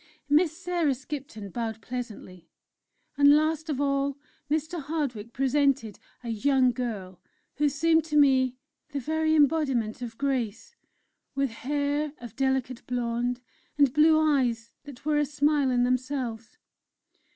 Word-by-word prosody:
Miss 310 Hz, +2 st, +3 dB
Sarah 350 Hz, -6 st, 0 dB
Skipton 260 Hz, -7 st, -7 dB
bowed 225 Hz, -1 st, -3 dB
pleasantly, 215 Hz, -7 st, -7 dB, 0.7 s
and 285 Hz, 0 st, +7 dB
last 310 Hz, +1 st, 0 dB
of 285 Hz, -3 st, -1 dB
all 275 Hz, 0 st, 0 dB, 0.3 s
Mr. 315 Hz, +2 st, -1 dB
Hardwick 270 Hz, -7 st, -3 dB
presented 270 Hz, -3 st, +1 dB, 0.2 s
a 235 Hz, -, -5 dB
young 255 Hz, +3 st, +3 dB
girl 210 Hz, -7 st, -5 dB, 0.4 s
who 295 Hz, 0 st, +3 dB
seemed 320 Hz, +3 st, +2 dB
to 300 Hz, -2 st, 0 dB
me 260 Hz, -3 st, +4 dB, 0.4 s
the 280 Hz, -, -1 dB
very 315 Hz, +3 st, +1 dB
embodiment 270 Hz, -7 st, +2 dB
of 230 Hz, -2 st, -6 dB
grace 270 Hz, -, -2 dB, 0.6 s
with 275 Hz, -2 st, 0 dB
hair 285 Hz, +4 st, -2 dB
of 240 Hz, -3 st, -10 dB
delicate 265 Hz, -2 st, -1 dB
blond, 245 Hz, 0 st, -1 dB, 0.4 s
and 280 Hz, -3 st, +4 dB
blue 310 Hz, +1 st, +5 dB
eyes 255 Hz, -7 st, +1 dB
that 280 Hz, -2 st, -12 dB
were 300 Hz, -1 st, +2 dB
a 295 Hz, -, +2 dB
smile 290 Hz, -1 st, +2 dB
in 245 Hz, -1 st, +2 dB
themselves. 250 Hz, -2 st, -2 dB
275 Hz, 130 wpm, -27 LUFS, 240-295 Hz, 0.7 s, and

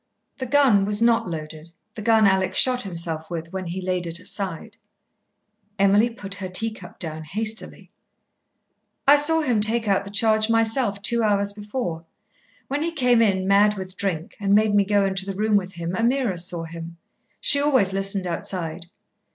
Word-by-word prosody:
The 260 Hz, -, -4 dB
gun 260 Hz, -7 st, +4 dB
was 205 Hz, +1 st, +1 dB
not 230 Hz, -3 st, +2 dB
loaded, 155 Hz, 0 st, -7 dB, 0.2 s
the 215 Hz, -, -8 dB
gun 220 Hz, 0 st, +4 dB
Alec 190 Hz, -1 st, +1 dB
shot 250 Hz, -1 st, +5 dB
himself 165 Hz, -5 st, -3 dB
with, 165 Hz, 0 st, -6 dB
when 190 Hz, -1 st, -4 dB
he 175 Hz, +3 st, -4 dB
laid 180 Hz, -1 st, -2 dB
it 165 Hz, 0 st, -4 dB
aside." 195 Hz, +3 st, -3 dB, 1.0 s
Emily 200 Hz, +4 st, +3 dB
put 205 Hz, -4 st, -10 dB
down 200 Hz, 0 st, -5 dB
her 185 Hz, -, -4 dB
tea 225 Hz, +5 st, 0 dB
cup 185 Hz, -6 st, -10 dB
hastily. 170 Hz, +8 st, -4 dB, 1.2 s
"I 285 Hz, -, +8 dB
saw 320 Hz, +3 st, +4 dB
him 245 Hz, -8 st, +1 dB
take 225 Hz, +1 st, 0 dB
out 195 Hz, -1 st, +2 dB
the 200 Hz, -, -9 dB
charge 215 Hz, +1 st, +2 dB
myself 225 Hz, -2 st, +1 dB
two 235 Hz, +2 st, +1 dB
hours 200 Hz, -2 st, +1 dB
before. 205 Hz, -5 st, -5 dB, 0.6 s
When 285 Hz, +2 st, -2 dB
he 335 Hz, +2 st, -1 dB
came 250 Hz, -6 st, +2 dB
in, 190 Hz, -4 st, +1 dB
mad 205 Hz, +1 st, +4 dB
with 185 Hz, 0 st, -7 dB
drink, 175 Hz, -4 st, -3 dB
and 200 Hz, -1 st, +2 dB
made 215 Hz, 0 st, +3 dB
me 205 Hz, -1 st, +3 dB
go 200 Hz, 0 st, +2 dB
into 190 Hz, 0 st, -1 dB
the 195 Hz, -, -4 dB
room 215 Hz, +1 st, +1 dB
with 190 Hz, -2 st, 0 dB
him, 170 Hz, +1 st, -5 dB
Ameerah 235 Hz, -4 st, 0 dB
saw 175 Hz, -1 st, -1 dB
him. 165 Hz, +1 st, -9 dB, 0.4 s
She 285 Hz, -, +2 dB
always 260 Hz, -10 st, +2 dB
listened 195 Hz, 0 st, -1 dB
outside. 170 Hz, -1 st, -4 dB
200 Hz, 175 wpm, -23 LUFS, 185-225 Hz, 1.2 s, I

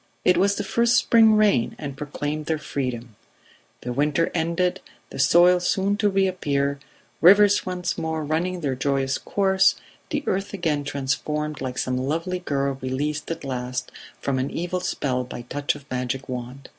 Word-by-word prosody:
It 180 Hz, -, +5 dB
was 200 Hz, +1 st, +3 dB
the 205 Hz, -, -2 dB
first 235 Hz, +4 st, +2 dB
spring 225 Hz, -2 st, +5 dB
rain 205 Hz, -, +3 dB
and 140 Hz, -3 st, -6 dB
proclaimed 150 Hz, +1 st, -4 dB
their 160 Hz, -, +1 dB
freedom: 125 Hz, -6 st, -4 dB, 0.7 s
the 125 Hz, -, -4 dB
winter 150 Hz, +4 st, +1 dB
ended, 175 Hz, +2 st, 0 dB, 0.3 s
the -, -, -7 dB
soil 175 Hz, +6 st, +5 dB
soon 195 Hz, +3 st, +1 dB
to 210 Hz, -1 st, +2 dB
reappear, 145 Hz, -8 st, 0 dB, 0.4 s
rivers 205 Hz, +3 st, +6 dB
once 180 Hz, 0 st, -2 dB
more 160 Hz, -1 st, -2 dB
running 175 Hz, +4 st, -1 dB
their 140 Hz, -4 st, -1 dB
joyous 135 Hz, 0 st, 0 dB
course, 195 Hz, -1 st, +2 dB, 0.3 s
the 295 Hz, -2 st, -2 dB
earth 195 Hz, +2 st, -2 dB
again 155 Hz, -6 st, -1 dB
transformed 145 Hz, +2 st, -2 dB
like 130 Hz, -1 st, -4 dB
some 125 Hz, 0 st, -1 dB
lovely 165 Hz, +7 st, -2 dB
girl 140 Hz, -5 st, -2 dB
released 145 Hz, +4 st, -2 dB
at 165 Hz, -, -4 dB
last 125 Hz, -2 st, -4 dB, 0.3 s
from 135 Hz, -2 st, -1 dB
an 130 Hz, -, -1 dB
evil 180 Hz, +2 st, -3 dB
spell 125 Hz, -7 st, -1 dB
by 120 Hz, -1 st, -8 dB
touch 145 Hz, +4 st, -2 dB
of 145 Hz, -2 st, -12 dB
magic 130 Hz, +1 st, -3 dB
wand. 125 Hz, +2 st, -6 dB
150 Hz, 160 wpm, -24 LUFS, 135-185 Hz, 0.7 s, rivers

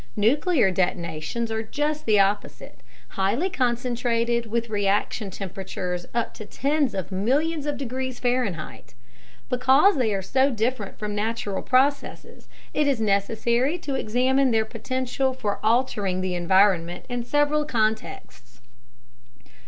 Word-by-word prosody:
Nuclear 250 Hz, -, +3 dB
detonations 175 Hz, +4 st, -2 dB
are 220 Hz, 0 st, -1 dB
just 295 Hz, +6 st, -3 dB
the 210 Hz, -2 st, +4 dB
opposite 200 Hz, +1 st, -1 dB, 0.3 s
highly 225 Hz, -, 0 dB
concentrated 235 Hz, -3 st, 0 dB
with 235 Hz, +1 st, -1 dB
reaction 205 Hz, 0 st, 0 dB
temperatures 185 Hz, -2 st, -5 dB
up 235 Hz, -1 st, -2 dB
to -, -, -9 dB
tens 280 Hz, -1 st, 0 dB
of 190 Hz, -1 st, -4 dB
millions 285 Hz, -, 0 dB
of 290 Hz, -, -2 dB
degrees 260 Hz, -1 st, -4 dB
Fahrenheit. 240 Hz, -, -2 dB, 0.5 s
Because 265 Hz, +9 st, +4 dB
they 240 Hz, -5 st, +1 dB
are 190 Hz, -, -3 dB
so 265 Hz, +7 st, +2 dB
different 225 Hz, -3 st, -2 dB
from 210 Hz, -1 st, -4 dB
natural 210 Hz, -1 st, -2 dB
processes, 270 Hz, +3 st, 0 dB, 0.2 s
it 300 Hz, -1 st, +1 dB
is 275 Hz, -4 st, +1 dB
necessary 230 Hz, -, +1 dB
to 290 Hz, -5 st, -5 dB
examine 260 Hz, +2 st, +2 dB
their 220 Hz, -2 st, +2 dB
potential 255 Hz, +3 st, -2 dB
for 210 Hz, -5 st, -2 dB
altering 215 Hz, -5 st, +1 dB
the 185 Hz, -1 st, -2 dB
environment 175 Hz, -1 st, +2 dB
in 245 Hz, -1 st, -3 dB
several 290 Hz, +4 st, +2 dB
contexts. 220 Hz, -, -3 dB
235 Hz, 125 wpm, -24 LUFS, 200-265 Hz, 0.5 s, the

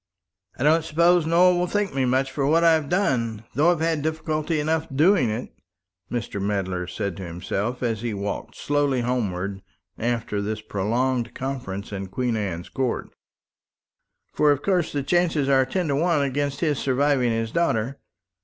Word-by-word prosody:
"I -, -, -2 dB
don't 160 Hz, +2 st, +4 dB
suppose 170 Hz, +1 st, +3 dB
Nowell 175 Hz, +2 st, +5 dB
will 180 Hz, -, +1 dB
thank 205 Hz, +1 st, -1 dB
me 135 Hz, -1 st, +1 dB
much 130 Hz, +2 st, +1 dB
for 135 Hz, 0 st, -1 dB
what 165 Hz, +3 st, +4 dB
I've 160 Hz, -4 st, +4 dB
done, 115 Hz, -, 0 dB
though 150 Hz, +7 st, +4 dB
I've 170 Hz, -3 st, -1 dB
had 165 Hz, -2 st, +1 dB
difficulty 155 Hz, 0 st, -1 dB
enough 160 Hz, +2 st, 0 dB
in 135 Hz, -, -7 dB
doing 165 Hz, -, +4 dB
it," 110 Hz, +4 st, -4 dB, 0.6 s
Mr. 115 Hz, -4 st, -3 dB
Medler 95 Hz, -3 st, -2 dB
said 100 Hz, -1 st, -3 dB
to 95 Hz, -, -6 dB
himself, 95 Hz, +8 st, -3 dB
as 115 Hz, -3 st, -1 dB
he 120 Hz, -1 st, -2 dB
walked 100 Hz, 0 st, -4 dB
slowly 145 Hz, -3 st, 0 dB
homewards 100 Hz, -6 st, -2 dB, 0.4 s
after 115 Hz, -3 st, -1 dB
this 105 Hz, +1 st, -3 dB
prolonged 120 Hz, +4 st, -1 dB
conference 125 Hz, -8 st, -5 dB
in 95 Hz, -1 st, -4 dB
Queen 120 Hz, +4 st, -1 dB
Anne's 95 Hz, -5 st, -3 dB
Court. 130 Hz, -3 st, -2 dB, 1.2 s
"For 150 Hz, -1 st, +4 dB
of 145 Hz, 0 st, 0 dB
course 180 Hz, -4 st, +1 dB
the 140 Hz, -1 st, -2 dB
chances 165 Hz, -3 st, +1 dB
are 135 Hz, -1 st, +4 dB
ten 180 Hz, +4 st, -1 dB
to 140 Hz, -, +1 dB
one 160 Hz, -1 st, +2 dB
against 140 Hz, +1 st, -2 dB
his 150 Hz, -5 st, +1 dB
surviving 135 Hz, -1 st, +2 dB
his 115 Hz, -1 st, -1 dB
daughter. 135 Hz, -5 st, 0 dB
135 Hz, 170 wpm, -24 LUFS, 110-155 Hz, 1.2 s, Nowell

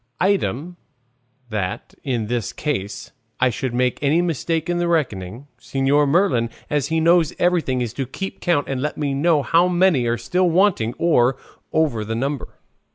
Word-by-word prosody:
Item, 175 Hz, -, 0 dB, 0.7 s
that, 100 Hz, -4 st, -3 dB
in 120 Hz, -5 st, -1 dB, 0.3 s
case 105 Hz, -10 st, -4 dB, 0.3 s
I 125 Hz, 0 st, +3 dB
should 130 Hz, +2 st, -3 dB
make 125 Hz, 0 st, 0 dB
any 150 Hz, +3 st, +3 dB
mistake 165 Hz, -1 st, -1 dB
in 175 Hz, 0 st, 0 dB
the 175 Hz, -, 0 dB
reckoning, 120 Hz, -, -2 dB
Señor 135 Hz, +4 st, +1 dB
Merlin, 140 Hz, -9 st, +2 dB, 0.2 s
as 145 Hz, -2 st, +1 dB
he 160 Hz, +1 st, 0 dB
knows 165 Hz, -1 st, +3 dB
everything, 165 Hz, -8 st, +1 dB
is 120 Hz, -2 st, -3 dB
to 135 Hz, 0 st, -3 dB
keep 195 Hz, +9 st, -6 dB
count, 170 Hz, -5 st, +1 dB
and 135 Hz, -2 st, -2 dB
let 150 Hz, -, -3 dB
me 145 Hz, -2 st, -1 dB
know 150 Hz, +1 st, +2 dB
how 170 Hz, +4 st, +3 dB
many 175 Hz, -8 st, +3 dB
are 120 Hz, 0 st, +1 dB
still 180 Hz, -, +1 dB
wanting 170 Hz, -, +2 dB
or 130 Hz, -6 st, +3 dB, 0.3 s
over 145 Hz, -9 st, +1 dB
the 110 Hz, +2 st, -3 dB
number." 135 Hz, +2 st, -2 dB
145 Hz, 160 wpm, -21 LUFS, 120-170 Hz, 0.7 s, I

